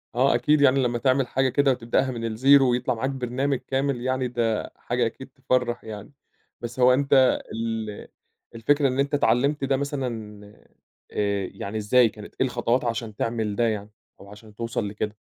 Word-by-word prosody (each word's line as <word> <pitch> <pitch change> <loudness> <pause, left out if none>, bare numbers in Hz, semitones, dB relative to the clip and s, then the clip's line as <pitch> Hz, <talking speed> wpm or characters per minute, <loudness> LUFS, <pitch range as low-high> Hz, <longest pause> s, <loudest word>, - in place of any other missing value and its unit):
آه، 130 0 +3
أكيد 145 +5 +2
يعني 135 -1 +4
لمّا 120 -1 0
تعمل 130 0 +1
حاجة 130 +1 +1
كده 140 +1 +3
وتبدأها 125 +2 0
من 115 -1 -5
الزيرو 130 +3 +4
ويطلَع 125 +1 0
معاك 130 +4 -2
برنامج 135 +1 -1
كامل 135 -2 -1
يعني 130 0 -1
ده 115 -3 -1
حاجة - - -1
أكيد - - -6
تفرّح 125 -2 -1
يعني. 110 +3 -9 0.5
بس 120 +2 -7
هو 125 0 +6
أنت 135 -1 +3
ال 110 -2 -4 0.5
الفكرة 140 +5 +2
إن 130 +1 -2
أنت 140 +1 0
اتعلّمت 140 +2 +2
ده 135 0 +1
مثلًا 120 -7 -4 0.7
آآ، 100 -2 -1
يعني 105 +2 -5
إزاي، 115 +3 +4
كانت 105 -1 -12
إيه - - +4
الخطوات 120 0 0
عشان 115 -2 -3
تعمل 110 -3 -2
ده 120 +1 +2
يعني 105 -1 -3 0.3
أو 100 - -14
عشان 105 0 -14
توصَل 115 -2 -3
لكده؟ 105 +1 -4
120 Hz, 175 wpm, -24 LUFS, 110-135 Hz, 0.7 s, هو